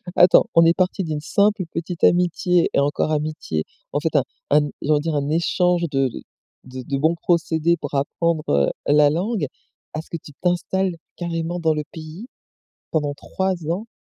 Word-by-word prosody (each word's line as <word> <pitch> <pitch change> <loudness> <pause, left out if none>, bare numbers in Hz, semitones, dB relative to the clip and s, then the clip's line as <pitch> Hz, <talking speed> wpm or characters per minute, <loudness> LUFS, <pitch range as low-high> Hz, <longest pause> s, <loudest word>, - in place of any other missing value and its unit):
Attends, 180 - +6
on 165 0 +7
est 165 - +5
parti 185 +1 +1
d'une 155 -3 -3
simple 200 +5 +2
petite 170 +1 -5
amitié 175 0 +3
et - - +3
encore 145 +2 0
amitié, 150 - -2 0.3
en 145 - +1
fait 160 +1 -2
un 140 - +4 0.3
un 145 0 +4
j'ai - - -4
envie 150 - +4
de - - -6
dire 165 -1 -1
un 145 0 -1
échange 175 +2 +1
de 135 -1 +2
de - - -8 0.4
de 130 0 -8
de 135 +2 -2
bons 160 +4 +2
procédés 170 -1 +1
pour - - -7
apprendre, 155 +3 0
heu, 70 -1 +3 0.2
la 145 0 +5
langue, 185 0 -1 0.5
à 155 - -3
ce - - -22
que 170 - -3
tu - - -11
t'installes 180 +1 0 0.2
carrément 170 0 -3
dans 160 -2 +2
le 150 - -2
pays 160 +8 -9 0.7
pendant 150 -3 0
3 190 +6 -2 0.2
ans! 190 +7 -2
165 Hz, 190 wpm, -22 LUFS, 150-175 Hz, 0.7 s, on